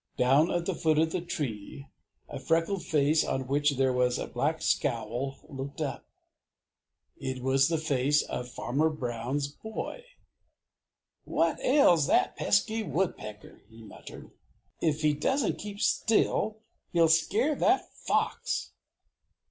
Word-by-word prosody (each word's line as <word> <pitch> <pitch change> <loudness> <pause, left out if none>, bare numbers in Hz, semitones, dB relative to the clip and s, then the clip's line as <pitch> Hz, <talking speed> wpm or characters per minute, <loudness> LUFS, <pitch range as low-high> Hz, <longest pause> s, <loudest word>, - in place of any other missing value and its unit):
Down 135 +7 +4
at 175 -2 -1
the 190 - -1
foot 160 -2 +1
of 160 +1 +2
the 180 - -2
tree 140 - -5 0.4
a - - -7
freckled 165 +3 0
face 150 +1 +2
on 130 0 -2
which 145 +1 +1
there 130 -1 +2
was 125 -1 +1
a - - -3
black - - -1
scowl 130 +5 -1
looked 140 +1 -7
up. 150 -3 -4 1.1
It 130 -1 -4
was 135 +1 +3
the 165 - 0
face 145 -1 +1
of 125 - -5
Farmer 140 +6 0
Brown's 130 0 -3
boy. 220 - -7 1.2
"What - - 0
ails 280 - +4
that - - +2
pesky 220 +3 +1
woodpecker?" 170 - -4
he 115 0 -14
muttered. 110 - -12 0.5
"If 155 -2 0
he 150 -1 +4
doesn't 255 - 0
keep 205 0 -7
still, 220 -1 +1 0.4
he'll 170 -1 +5
scare 195 - +2
that 370 +6 +1
fox!" - - -1
150 Hz, 130 wpm, -29 LUFS, 130-175 Hz, 1.2 s, he'll